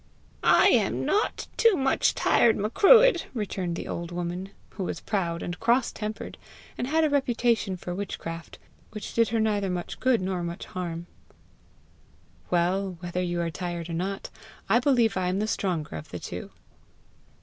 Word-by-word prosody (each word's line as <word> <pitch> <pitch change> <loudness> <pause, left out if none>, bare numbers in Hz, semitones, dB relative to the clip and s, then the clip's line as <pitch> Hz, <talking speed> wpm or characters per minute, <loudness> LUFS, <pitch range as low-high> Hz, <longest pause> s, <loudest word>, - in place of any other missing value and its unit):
"I - - +6
am - - +2
not 420 +2 0
too 460 -3 +5
much 270 -1 +2
tired, 230 - +4
Macruadh!" 395 - +5
returned 190 -5 -2
the - - -5
old 170 0 -5
woman, 175 +2 -4 0.2
who 195 - -5
was - - -4
proud 170 -5 -2
and 175 - -5
cross 235 +2 +2
tempered, 215 0 -6 0.4
and 245 - -3
had 320 +3 +2
a 310 - +3
reputation 235 -7 +1
for 175 0 -5
witchcraft, 170 -3 -6 0.4
which 215 -2 -6
did 230 -1 +3
her 230 - 0
neither 205 -3 +1
much 180 -1 -4
good 255 -3 +3
nor 185 -1 -2
much 170 0 -5
harm. 170 -2 -5 1.4
"Well, 180 +1 0
whether 175 0 -3
you 175 -1 -1
are 170 -1 -2
tired 170 +1 -5
or - - -4
not, 190 +4 -3 0.4
I 235 - +4
believe 240 -6 +2
I 185 -1 0
am 185 +1 0
the 210 - 0
stronger 180 - -2
of 75 - -8
the - - -5
two!" - - -7
190 Hz, 165 wpm, -27 LUFS, 175-230 Hz, 1.4 s, I